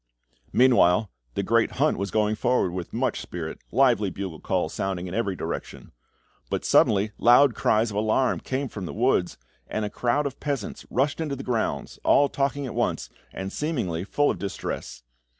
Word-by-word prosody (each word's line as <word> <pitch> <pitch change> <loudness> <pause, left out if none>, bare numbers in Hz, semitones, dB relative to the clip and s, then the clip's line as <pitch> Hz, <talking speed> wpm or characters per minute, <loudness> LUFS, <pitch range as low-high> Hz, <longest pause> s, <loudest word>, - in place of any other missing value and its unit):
Meanwhile, 110 -6 +4 0.2
the - - 0
great - - +2
hunt - - +2
was 100 0 -3
going 105 -1 +1
forward 120 -4 +1
with 90 -1 -5
much - - -1
spirit, - - -6
lively 120 -5 +3
bugle 95 -4 -6
calls - - -1
sounding 95 -2 -2
in 90 - -6
every 100 -3 -1
direction; - - -6 0.6
but - - -2
suddenly 105 +1 +4
loud 125 +2 +6
cries 110 +1 +2
of 100 - -4
alarm 110 +5 +1
came 135 +1 -3
from 100 -6 -6
the - - -7
woods, 115 -7 +1 0.3
and 110 - -2
a 105 - -5
crowd 135 +5 0
of 140 -1 -4
peasants 140 -8 -4
rushed 140 +6 0
into 150 -3 -2
the 135 - -7
grounds, 120 -4 -2
all 145 0 +4
talking 140 0 -1
at 125 - -5
once, - - -1 0.2
and 95 0 -6
seemingly 120 - -2
full 145 +8 +1
of - - -6
distress. 100 -9 -5
110 Hz, 175 wpm, -25 LUFS, 95-135 Hz, 0.6 s, loud